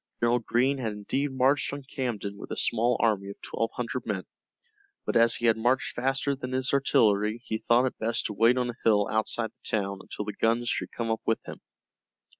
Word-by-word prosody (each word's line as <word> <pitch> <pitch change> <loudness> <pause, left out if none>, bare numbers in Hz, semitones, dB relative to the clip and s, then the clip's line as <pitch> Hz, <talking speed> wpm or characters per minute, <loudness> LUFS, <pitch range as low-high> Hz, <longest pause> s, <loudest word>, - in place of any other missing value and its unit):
General 120 +1 +3
Greene 130 +4 +1
had 110 -4 -2
indeed 135 +7 -2
marched 130 +2 +2
on 140 0 -6
Camden 120 -7 -4
with 100 - -10
a - - -4
small 120 +2 +2
army 105 -4 +1
of 100 - -9
twelve 115 - -2
hundred 125 +1 -3
men, 100 -4 -2 0.8
but - - -2
as 115 0 +5
he 120 - -2
had 115 -1 +4
marched 125 +3 +1
faster 135 +2 0
than 130 -1 -6
his 130 0 0
artillery 110 -5 +3
he 110 - -2
thought 120 +3 +3
it 130 - -3
best 115 +1 -1
to 105 - -2
wait 115 +4 +4
on 125 -1 0
a 120 - -16
hill 105 -2 +4
outside 110 +1 0
the - - -10
town 100 -1 -3
until 105 - -6
the 105 - -4
guns 115 +2 +1
should - - -2
come 115 -1 -3
up 110 - -1
with 115 - +3
him. - - -9
115 Hz, 215 wpm, -27 LUFS, 110-125 Hz, 0.8 s, as